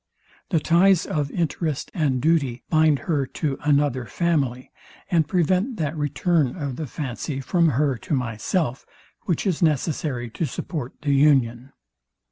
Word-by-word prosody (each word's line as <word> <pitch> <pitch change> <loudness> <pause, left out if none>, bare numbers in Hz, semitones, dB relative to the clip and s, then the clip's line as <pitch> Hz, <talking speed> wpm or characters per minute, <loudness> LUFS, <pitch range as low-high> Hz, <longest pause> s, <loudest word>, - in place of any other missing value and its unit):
The 170 - +2
ties 180 +3 +4
of 145 -2 -1
interest 155 -2 -2
and 145 -8 +1
duty 140 -5 +1
bind 155 -2 +4
her 145 -6 0
to 145 -4 -1
another 145 -4 +2
family, 140 -8 -1 0.4
and 165 -4 +3
prevent 185 - +1
that 155 -2 -2
return 150 -1 +1
of 140 -6 -4
the 155 +1 -5
fancy 135 +1 -4
from 170 +4 +2
her 140 -2 +1
to 150 - -2
myself, 125 - -2 0.4
which 175 -4 -1
is 185 -5 0
necessary 150 -5 0
to 165 - -2
support 140 -1 -5
the 145 -1 +2
union. 135 -3 +3
150 Hz, 140 wpm, -23 LUFS, 130-165 Hz, 0.4 s, ties